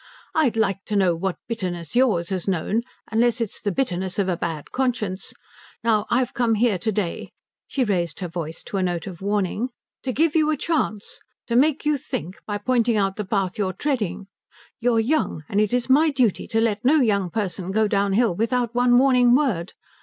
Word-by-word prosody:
"I'd 270 -8 +2
like 195 -3 0
to 210 - -3
know 185 -4 +3
what 185 +2 -2
bitterness 180 -7 -4
yours 215 -10 +2
has 190 -2 -3
known, 195 +4 0 0.3
unless 235 +1 +2
it's 230 -4 -3
the 205 - -1
bitterness 185 -6 -2
of 200 -2 +1
a 180 - +1
bad 165 -3 -5
conscience. 235 -7 -2 0.5
Now 220 -2 +2
I've 250 0 +1
come 235 -2 +2
here 215 -3 +2
to 220 +5 0
day" 190 -4 -3 0.4
she 270 - 0
raised 175 -8 -1
her 185 - -3
voice 165 -1 -6
to 200 - -4
a - - +1
note 175 -2 -1
of 185 -3 -8
warning 205 +4 -1 0.3
"to 260 - -2
give 315 +4 +1
you 310 -1 +3
a 310 - +1
chance. 265 -10 -2 0.3
To 235 - -2
make 295 +4 +3
you 300 -1 +2
think, 180 -4 -5
by 205 -1 -2
pointing 235 +1 +1
out 195 -1 +1
the 210 - -3
path 195 -1 -1
you 200 - +1
are 185 - -3
treading. 210 - -2 0.5
You 240 0 +2
are - - +4
young, 230 - 0
and 205 - +1
it 215 - +1
is 245 0 0
my 295 +5 +5
duty 255 -8 +1
to 225 - 0
let 220 -2 0
no 270 +5 +5
young 205 - +2
person 185 -2 -3
go 215 +2 +2
downhill 200 +1 +2
without 235 +4 0
one 245 0 +4
warning 250 -2 +5
word. 225 - 0
215 Hz, 205 wpm, -23 LUFS, 190-245 Hz, 0.5 s, my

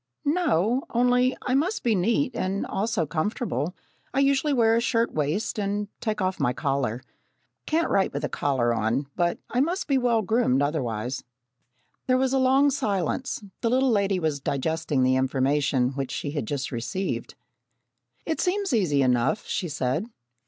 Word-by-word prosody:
"No, 270 - +2
only 250 +1 +2
I 255 - -1
must 335 +11 +1
be 235 - +3
neat 230 +8 +1
and 195 +2 -1
also 210 -4 -1
comfortable. 170 - -2 0.4
I - - +3
usually 275 +2 +2
wear 230 -4 +4
a 230 - +2
shirt 235 -1 +1
waist 155 +9 -1
and 205 0 -2
take 215 -2 -2
off 185 0 -1
my 125 - +1
collar. 130 -3 -1 0.6
Can't 325 +2 +1
write 195 - +2
with 140 - -4
a - - 0
collar 125 -4 0
on, 115 +5 0
but 175 -1 +1
I 245 - +1
must 345 +7 0
be 275 -3 +3
well 235 -3 +2
groomed 185 - +2
otherwise." 130 -4 -2 0.8
There 255 0 +4
was 260 0 +1
a 270 - +3
long 270 +2 +4
silence. 215 - -1 0.2
The 230 - +1
little 260 +1 +3
lady 200 -3 +2
was 155 -4 -1
digesting 145 0 -1
the 130 0 +3
information 130 0 +1
which 135 -1 -4
she 145 - -4
had 145 -7 -3
just 140 -1 -3
received. 120 +2 -3 0.9
"It 320 - -1
seems 390 -3 0
easy 155 - +2
enough," 125 - +1
she 185 -5 -2
said. 145 - -1
190 Hz, 165 wpm, -25 LUFS, -, 0.9 s, wear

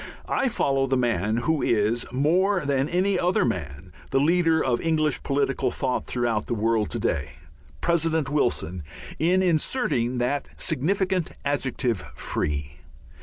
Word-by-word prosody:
I 265 - +1
follow 135 - +1
the 130 0 +1
man 110 -3 +1
who 160 -2 +1
is, 115 +2 +1
more 175 +7 +2
than 140 +1 +1
any 185 +2 +1
other 180 -4 +2
man, 85 - -4 0.2
the 135 - +2
leader 165 +2 +3
of 125 -5 0
English 155 -3 +1
political 140 -1 0
thought 130 -2 -2
throughout 120 -3 -1
the 120 - -1
world 110 0 +1
to - - -3
day, 70 +1 -1 0.5
President 165 -3 +1
Wilson, 120 - 0 0.4
in 180 +4 +3
inserting 155 - +1
that 125 +4 -1
significant 185 +4 0
adjective 130 -6 0 0.2
"Free." 75 0 -3
135 Hz, 135 wpm, -25 LUFS, 115-165 Hz, 0.5 s, leader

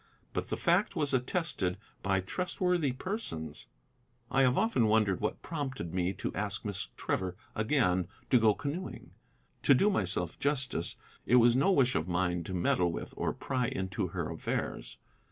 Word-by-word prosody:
But - - -3
the - - -1
fact 175 +4 +2
was 145 -4 +1
attested 125 - 0 0.2
by 95 -1 +1
trustworthy 180 - 0
persons. 125 - -5 0.6
I 135 - +4
have 130 -1 +4
often 175 - +3
wondered 105 -3 +3
what 105 - -2
prompted 135 - -4
me 90 0 +1
to 95 - -4
ask 105 +1 -2
Miss 100 -2 -3
Trevor 95 -1 -1 0.2
again 105 - +2 0.2
to 125 - +7
go 110 -2 +4
canoeing. 145 +6 -5 0.5
To 140 - +6
do 205 +10 +4
myself 90 - -1
justice, 135 - 0 0.3
it 125 - +5
was 120 -1 +6
no 140 +10 +4
wish 130 -8 +4
of 80 +1 0
mine 90 -1 0
to 95 - -5
meddle 85 0 +2
with - - -6
or - - 0
pry 130 -3 -1
into 95 -2 -2
her - - -3
affairs. - - -3
115 Hz, 160 wpm, -31 LUFS, 90-145 Hz, 0.6 s, to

